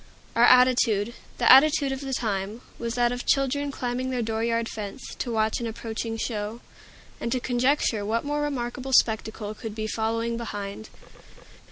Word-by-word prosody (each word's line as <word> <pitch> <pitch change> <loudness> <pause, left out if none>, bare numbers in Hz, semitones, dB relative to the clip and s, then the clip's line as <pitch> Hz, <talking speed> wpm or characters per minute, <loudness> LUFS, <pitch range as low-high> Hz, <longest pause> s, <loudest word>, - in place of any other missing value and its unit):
Our 235 - +6
attitude 240 -4 +4 0.2
the 240 - +5
attitude 280 +1 +6
of 270 0 -4
the 270 -2 -3
time 210 0 -2 0.2
was 235 0 -3
that 240 -1 +2
of 245 0 -4
children 280 +1 +1
climbing 255 0 -3
their 250 -2 -1
dooryard 230 +1 -1
fence, 210 +3 -7
to 245 - -2
watch 220 -1 +1
an 235 - -3
approaching 225 0 -4
show, 215 0 -3 0.6
and 235 - -3
to 255 - +1
conjecture 245 -3 +1
what 225 +5 -1
more 295 +1 -1
remarkable 260 -2 -3
spectacle 220 -2 +2
could 215 0 -7
be 215 -1 -3
following 230 +2 -1
behind. 205 -2 -6
235 Hz, 160 wpm, -26 LUFS, 220-255 Hz, 0.6 s, Our